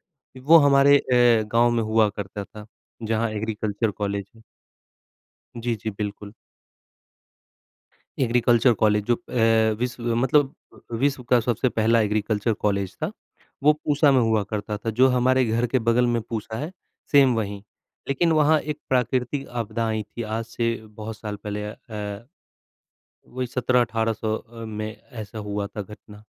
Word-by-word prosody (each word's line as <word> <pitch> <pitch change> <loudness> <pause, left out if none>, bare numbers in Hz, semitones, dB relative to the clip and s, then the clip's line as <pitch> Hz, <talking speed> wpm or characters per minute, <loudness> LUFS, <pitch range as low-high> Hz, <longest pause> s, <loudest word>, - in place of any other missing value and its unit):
अ, 130 -1 -18
वो 155 +6 +7
हमारे 140 0 +6
अ, 120 -4 +3
गाँव 120 +1 +4
में 115 -1 +1
हुआ 110 -1 +3
करता 100 0 -6
था, 105 +1 -12 0.4
जहाँ 110 +1 0
एग्रीकल्चर 110 0 -2
कॉलेज 100 -1 -4
है। 110 - -18 1.2
जी, 120 0 -1
जी 110 - -1
बिल्कुल। 105 0 -5 1.9
एग्रीकल्चर 120 0 +3
कॉलेज 105 -1 +3
जो 120 - +3
अ, 115 -2 +2
विश्व 120 -1 -2
मतलब 135 +3 +2 0.5
विश्व 135 -2 +1
का 125 - +5
सबसे 120 +2 0
पहला 115 0 +2
एग्रीकल्चर 105 +1 0
कॉलेज 100 -2 -1
था, 155 - 0 0.5
वो 150 +1 +6
पूसा 150 -1 +2
में 130 - +4
हुआ 110 -2 +2
करता 105 0 -3
था, 110 +2 -3
जो 130 +4 +4
हमारे 130 +1 +3
घर 115 +2 0
के 130 +2 +1
बगल 120 +1 +4
में 120 -1 +1
पूसा 110 -1 -5
है 155 +6 -4 0.4
सेम 135 -4 +6
वहीं। 100 -2 -3 0.5
लेकिन 165 +4 +2
वहाँ 155 0 +4
एक 150 0 -5
प्राकृतिक 130 +2 0
आपदा 115 -1 -3
आई 110 -1 -1
थी, 105 +3 -8
आज 110 +1 -3
से 115 0 -2
बहुत 110 +1 -8
साल 105 -1 -6
पहले 105 0 -4
अ 105 - -6 0.2
अ, 105 +1 -6 1.0
वही 125 0 -4
17-1800 115 -3 0
अ, 115 0 -11
में 110 0 -5 0.3
ऐसा 110 +1 -9
हुआ 105 -1 -3
था 105 +1 -6
घटना। 105 +1 -13
115 Hz, 150 wpm, -24 LUFS, 105-125 Hz, 1.9 s, वो